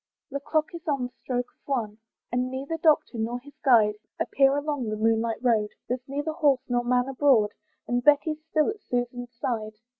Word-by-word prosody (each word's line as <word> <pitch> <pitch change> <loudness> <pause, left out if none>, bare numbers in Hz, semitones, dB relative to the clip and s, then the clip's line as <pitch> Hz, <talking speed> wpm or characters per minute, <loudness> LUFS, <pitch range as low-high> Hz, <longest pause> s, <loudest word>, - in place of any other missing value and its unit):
The 280 - -2
clock 310 +5 -1
is 335 -1 -9
on 280 -4 0
the 245 0 -5
stroke 245 -1 -1
of - - -44
one; 225 -6 -2 0.3
But 245 - +1
neither 260 +5 -2
Doctor 305 -7 +2
nor 235 +2 -2
his 285 +3 -15
guide 220 -6 +5 0.2
Appear 275 0 +3
along 290 -5 -2
the 215 - -1
moonlight 225 +1 +1
road, 220 -4 +3 0.2
There's 250 +1 -2
neither 290 +3 -2
horse 285 -5 +2
nor 245 -1 +1
man 250 +1 +2
abroad, 260 -6 +3 0.4
And 245 0 0
Betty's 300 +2 +3
still 315 +3 +1
at 420 -1 -10
Susan's 245 0 -3
side. 220 -3 -3
250 Hz, 185 wpm, -26 LUFS, 235-290 Hz, 0.4 s, guide